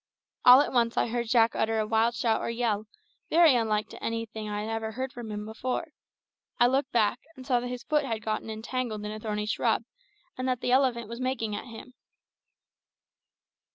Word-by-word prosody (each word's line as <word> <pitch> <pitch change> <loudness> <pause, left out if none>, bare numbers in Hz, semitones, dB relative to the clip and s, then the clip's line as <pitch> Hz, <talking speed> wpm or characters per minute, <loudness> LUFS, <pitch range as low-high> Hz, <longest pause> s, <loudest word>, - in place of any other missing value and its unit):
All 250 +2 +10
at - - -2
once 235 -2 +2
I - - +3
heard 240 0 -2
Jack 230 -1 +4
utter 220 0 +1
a 215 - +1
wild 225 +2 +2
shout 225 -1 +1
or - - -2
yell, 225 -3 -1 0.4
very 330 -3 +6
unlike 215 -2 +1
to - - -11
anything 225 -1 -4
I 210 0 -3
ever 225 0 -3
heard 260 +2 -4
from 235 -3 -7
him 210 0 -5
before. 255 +8 -3 0.7
I 240 - +6
looked 265 +2 +1
back, 220 -3 +2 0.2
and 260 - -11
saw 250 -3 +2
that 245 - -4
his 250 0 -5
foot 300 -1 +1
had 225 -5 -3
got 215 -1 -1
entangled 220 0 -4
in 210 - -4
a 215 - -6
thorny 210 -1 -3
shrub, 215 - +1 0.6
and 255 - -1
that 255 -2 -1
the 245 - 0
elephant 250 -4 +2
was 235 +3 -7
making 255 -5 -1
at - - -6
him. 250 +1 -11
230 Hz, 195 wpm, -28 LUFS, 220-250 Hz, 0.7 s, All